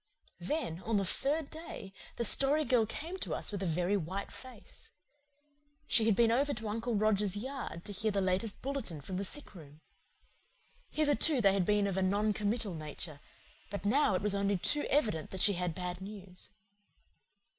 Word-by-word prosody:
Then, 235 - -2
on 220 0 0
the 195 - +1
third 280 - -1
day, 310 - -8 0.2
the 235 - -1
Story 285 +7 +5
Girl 240 -5 +3
came 335 - -5
to - - -2
us - - -3
with 200 -2 -4
a 190 - -1
very 175 +4 +1
white 190 +2 -3
face. 255 -5 -12 1.0
She 225 - +3
had 220 - +4
been 230 +1 +4
over 280 +4 +2
to 220 0 -4
Uncle 230 +2 -2
Roger's 205 -2 +2
yard 250 -7 -5
to - - -6
hear 215 +3 0
the 200 -1 0
latest 190 +3 -1
bulletin 260 - -4
from 185 +6 -5
the 195 - -1
sick 290 +8 -4
room. 150 -5 -13 1.1
Hitherto 300 -1 +3
they 200 -4 +5
had 195 -2 +1
been 210 0 +3
of 195 -2 -1
a - - +2
non 205 +3 +2
committal 210 -1 -1
nature; 155 -1 -7 0.5
but 200 0 -5
now 220 -2 +3
it 185 - -1
was 210 -1 +3
only 200 0 +1
too 295 +11 +2
evident 215 - +1
that 190 - -5
she 205 - +6
had 180 -2 -2
bad 180 0 -4
news. 195 -2 -10
205 Hz, 185 wpm, -33 LUFS, 185-240 Hz, 1.1 s, she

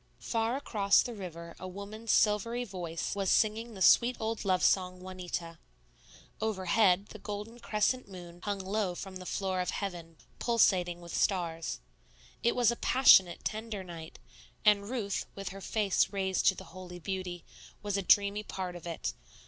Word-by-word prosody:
Far 230 +1 -1
across 205 -8 +3
the 245 - -5
river 170 -5 -8
a 185 - -6
woman's 205 +4 -5
silvery 230 +3 +2
voice 175 -6 -4
was 195 -2 0
singing 220 +1 +2
the 190 - 0
sweet 245 +1 +6
old 225 0 -2
love 185 -3 +1
song, 185 -1 +2
"Juanita;" 180 -3 -6 0.8
overhead, 195 -2 +2
the 215 - -10
golden 210 +3 -6
crescent 235 +3 0
moon 175 -2 -11
hung 205 0 -2
low 195 -1 -1
from 190 +1 -7
the 185 0 -9
floor 190 -2 -1
of 180 - -2
heaven 170 -5 -5 0.2
pulsating 185 -7 +2
with 170 0 -7
stars; 165 -4 -1 0.6
it 235 +1 +2
was 240 -2 +4
a - - -2
passionate, 195 -9 +5
tender 215 -2 -3
night, 165 -3 -9 0.5
and 205 -1 +4
Ruth, 220 -6 -2
with 195 -1 -5
her 195 +2 -9
face 205 -1 +1
raised 190 -2 0
to 190 - +5
the - - -9
holy 180 -1 -9
beauty, 180 0 -5 0.4
was 205 -1 -1
a 200 - +1
dreamy 200 +2 +4
part 185 -4 -5
of 175 -1 -8
it. 165 - -3
195 Hz, 165 wpm, -31 LUFS, 180-215 Hz, 0.8 s, sweet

